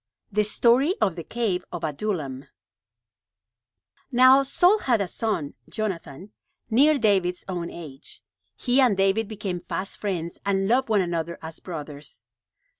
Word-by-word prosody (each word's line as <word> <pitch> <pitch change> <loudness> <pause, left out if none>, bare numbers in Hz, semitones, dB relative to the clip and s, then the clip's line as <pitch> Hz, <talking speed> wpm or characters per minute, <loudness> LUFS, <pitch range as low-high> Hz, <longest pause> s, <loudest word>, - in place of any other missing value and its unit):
THE 210 +1 +2
STORY 245 - +3
OF 190 -5 +1
THE 170 - -6
CAVE 220 -5 -1
OF 175 -1 -6
ADULLAM 150 -4 -3 1.7
Now 255 +2 +7
Saul 355 +9 +3
had 240 - +2
a 200 - -1
son, 180 -7 -2 0.2
Jonathan, 195 -4 -5 0.4
near 290 +6 +5
David's 190 -6 +1
own 175 -2 -3
age. 150 -4 -10 0.3
He 255 +1 +2
and 240 -7 +3
David 195 +3 +2
became 200 -4 -4
fast 185 +3 -5
friends 175 -5 -3
and 195 -1 +1
loved 250 +3 +2
one 210 -3 +3
another 170 -1 -2
as 160 0 -7
brothers. 150 -8 -8
195 Hz, 135 wpm, -25 LUFS, 170-230 Hz, 1.7 s, Now